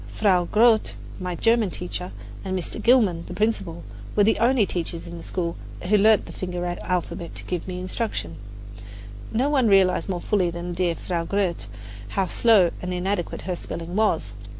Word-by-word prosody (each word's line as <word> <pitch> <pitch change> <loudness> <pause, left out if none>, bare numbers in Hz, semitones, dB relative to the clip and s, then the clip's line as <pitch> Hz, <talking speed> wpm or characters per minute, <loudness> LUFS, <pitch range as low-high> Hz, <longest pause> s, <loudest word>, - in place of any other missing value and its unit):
Frau 185 -5 +2
Grote, 220 +4 +4 0.3
my 180 -1 -3
German 225 +1 +3
teacher, 180 +1 -5 0.3
and 190 0 -2
Mr. 180 - -5
Gilman, 215 -9 +4
the - - -7
principal, 195 -6 -1 0.3
were 205 - +5
the 220 - +3
only 240 -1 +4
teachers 170 -2 -3
in 170 0 -8
the 165 - -9
school 170 -2 -2 0.3
who 195 +4 +2
learned 210 +1 +5
the - - -9
finger 180 -1 -4
alphabet 175 -1 -3
to - - -5
give 180 -1 -4
me 180 -1 -4
instruction. 185 - -3 0.9
No 245 +5 +1
one 275 -5 +3
realized 195 -2 +4
more 180 -2 -1
fully 185 -1 +1
than 170 +1 -5
dear 175 -1 0
Frau 170 -1 -3
Grote 175 - -1 0.5
how 195 - +3
slow 200 -3 +4
and 180 - -4
inadequate 180 0 -2
her 180 -1 -2
spelling 170 +1 -6
was. 170 - +1
185 Hz, 175 wpm, -24 LUFS, 175-210 Hz, 0.9 s, were